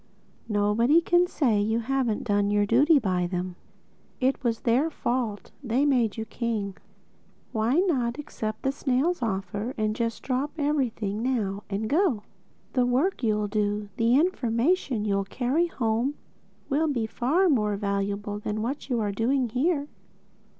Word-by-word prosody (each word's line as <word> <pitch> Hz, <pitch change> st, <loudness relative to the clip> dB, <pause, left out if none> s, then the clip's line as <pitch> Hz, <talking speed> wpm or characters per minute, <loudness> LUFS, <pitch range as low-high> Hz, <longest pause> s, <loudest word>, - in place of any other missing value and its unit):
Nobody 215 Hz, +8 st, +3 dB
can 350 Hz, +1 st, +3 dB
say 235 Hz, -12 st, +1 dB
you 220 Hz, +2 st, +1 dB
haven't 250 Hz, -3 st, 0 dB
done 205 Hz, -2 st, +1 dB
your 205 Hz, 0 st, +2 dB
duty 285 Hz, +9 st, +5 dB
by 185 Hz, -7 st, 0 dB
them. 180 Hz, 0 st, -3 dB, 0.6 s
It 265 Hz, +1 st, +1 dB
was 230 Hz, -2 st, 0 dB
their 255 Hz, +7 st, +2 dB
fault: 240 Hz, -8 st, -2 dB
they 255 Hz, +3 st, +1 dB
made 245 Hz, -7 st, +2 dB
you 220 Hz, -, -3 dB
king. 220 Hz, -5 st, -3 dB, 0.8 s
Why 225 Hz, +3 st, +1 dB
not 250 Hz, -11 st, 0 dB
accept 220 Hz, -7 st, -5 dB
the 270 Hz, -, +2 dB
snail's 275 Hz, +4 st, 0 dB
offer; 210 Hz, +2 st, -3 dB
and 215 Hz, -1 st, 0 dB
just 230 Hz, -1 st, -2 dB
drop 270 Hz, +3 st, -1 dB
everything 250 Hz, -9 st, -1 dB
now, 215 Hz, -6 st, -1 dB
and 205 Hz, +2 st, -2 dB
go? 295 Hz, -, +2 dB, 0.5 s
The 255 Hz, -, +3 dB
work 275 Hz, +11 st, +1 dB
you'll 210 Hz, -3 st, +1 dB
do, 205 Hz, 0 st, -1 dB
the 230 Hz, +2 st, +3 dB
information 265 Hz, -, +1 dB
you'll 200 Hz, -1 st, +1 dB
carry 260 Hz, -, 0 dB
home, 240 Hz, -1 st, -1 dB, 0.5 s
will 305 Hz, +3 st, +1 dB
be 260 Hz, -6 st, 0 dB
of 220 Hz, -, -5 dB
far 325 Hz, +11 st, +2 dB
more 210 Hz, -, +2 dB
value 200 Hz, 0 st, -1 dB, 0.2 s
than 215 Hz, 0 st, -2 dB
what 275 Hz, +4 st, -4 dB
you're 225 Hz, -5 st, 0 dB
doing 245 Hz, +5 st, +1 dB
here." 285 Hz, +5 st, 0 dB
235 Hz, 150 wpm, -26 LUFS, 210-275 Hz, 0.8 s, duty